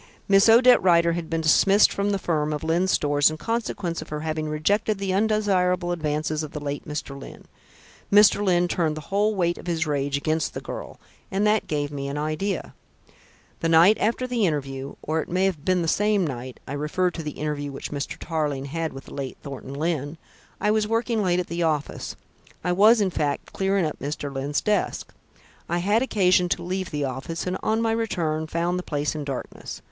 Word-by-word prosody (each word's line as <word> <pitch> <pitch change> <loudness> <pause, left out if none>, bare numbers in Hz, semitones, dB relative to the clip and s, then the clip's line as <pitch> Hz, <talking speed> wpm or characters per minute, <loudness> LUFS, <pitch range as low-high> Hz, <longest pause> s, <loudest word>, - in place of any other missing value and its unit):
"Miss 195 +2 +5
Odette 245 +2 +7
Rider 170 -2 +4
had 170 -1 -4
been 165 0 -1
dismissed 195 +6 +5
from 200 +1 0
the 200 - +1
firm 155 -5 -1
of 150 - -4
Lyne's 170 +4 +1
Stores 145 -4 +3
in 155 - -5
consequence 200 -6 -2
of 155 - -10
her 150 0 -4
having 155 -1 -2
rejected 200 +8 +1
the 195 -1 -2
undesirable 190 -4 +1
advances 155 -2 -1
of 155 -1 -7
the 150 - -4
late 145 +1 -5
Mr. 150 -1 -4
Lyne. - - -11 0.7
Mr. 205 0 +6
Lyne 175 -2 +3
turned 160 -3 0
the 155 - -9
whole 210 +2 +2
weight 175 -2 0
of - - -11
his 165 -1 0
rage 140 -1 -1
against 155 +1 -1
this - - -5
girl, - - -7 0.3
and 195 +2 0
that 210 0 +2
gave 145 -1 -2
me 140 -1 -4
an 140 +1 -4
idea. 155 +6 -2 0.9
"The 165 - 0
night 165 +6 +7
after 235 +4 0
the 240 -5 +1
interview 135 -3 -3
or 160 +1 0
it - - -8
may 185 +2 +1
have 175 -7 -1
been 185 -1 +2
the - - -2
same 205 +1 +2
night 130 -3 -6
I 135 - -5
refer 150 +5 0
to 170 - -6
the 150 -2 -5
interview 145 -1 -3
which 135 - -7
Mr. 145 -1 -4
Tarling 150 -4 -2
had 160 +3 -3
with 135 0 -9
the - - -12
late 135 -2 -5
Thornton 135 -1 -7
Lyne 155 0 -2 0.4
I 210 - +2
was 215 -1 +1
working 230 0 0
late 180 -2 +2
at 180 - -1
the 170 +1 -4
office. 155 -3 -1 0.5
I 180 - 0
was, 215 +5 +6
in 195 -2 +1
fact, 145 -4 -2
clearing 195 -2 +1
up 155 - -4
Mr. 145 0 -4
Lyne's 140 +2 -1
desk. 210 -1 -1 0.6
I 175 - +1
had 205 +6 +2
occasion 185 -7 +3
to 175 - -1
leave 185 +1 -3
the 145 -1 -2
office, 135 +6 -4
and 180 0 -1
on 220 +1 +1
my 225 - +1
return 165 -9 -1
found 170 +3 -1
the - - -2
place 145 -4 -2
in 155 -1 -4
darkness. 135 -3 -6
170 Hz, 205 wpm, -24 LUFS, 150-195 Hz, 0.9 s, Odette